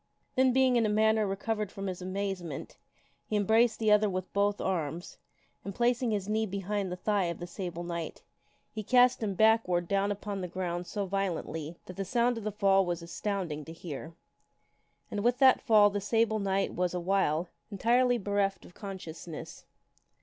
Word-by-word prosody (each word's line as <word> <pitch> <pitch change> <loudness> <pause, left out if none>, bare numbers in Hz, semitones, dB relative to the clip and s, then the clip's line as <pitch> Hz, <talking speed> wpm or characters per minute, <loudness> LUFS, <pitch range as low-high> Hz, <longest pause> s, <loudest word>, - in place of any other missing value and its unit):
Then, 260 0 +4
being 255 -1 +4
in 230 - +3
a - - 0
manner 220 0 +3
re 195 - -1
covered 210 0 -2
from 195 - -6
his 185 -1 -4
amazement, 185 -5 -4 0.5
he 215 - -2
embraced 220 +3 +3
the 220 -2 +2
other 210 0 +5
with 185 -1 -4
both 200 0 +1
arms, 170 -2 -3 0.4
and 200 -1 -6
placing 245 0 +1
his 205 -3 -1
knee 220 +1 0
behind 200 0 -2
the - - -2
thigh 200 +1 0
of 170 0 -3
the 175 - -6
Sable 175 -1 -5
Knight, 170 -2 -5 0.5
he 220 - -5
cast 250 +3 +4
him 205 -3 -1
backward 215 -5 +3
down 200 +1 +1
upon 205 -1 -4
the 180 - -3
ground 175 -1 -3
so 205 -2 -3
violently 175 -4 -3
that 185 - -10
the 195 - -1
sound 240 +3 +1
of - - -9
the 215 - -2
fall 195 -1 +3
was 175 -2 -3
astounding 170 -3 -3
to 160 - -9
hear. 165 -1 -8 1.0
And 205 - -2
with 240 +1 +3
that 265 -1 +6
fall 210 -3 +5
the 205 0 -2
Sable 220 +1 +1
Knight 195 -1 0
was, 180 0 -1
awhile, 175 -2 +1 0.2
en 200 - -5
tirely 245 +3 +3
bereft 200 -2 -1
of - - -15
consciousness. 175 -5 -8
200 Hz, 185 wpm, -30 LUFS, 180-215 Hz, 1.0 s, that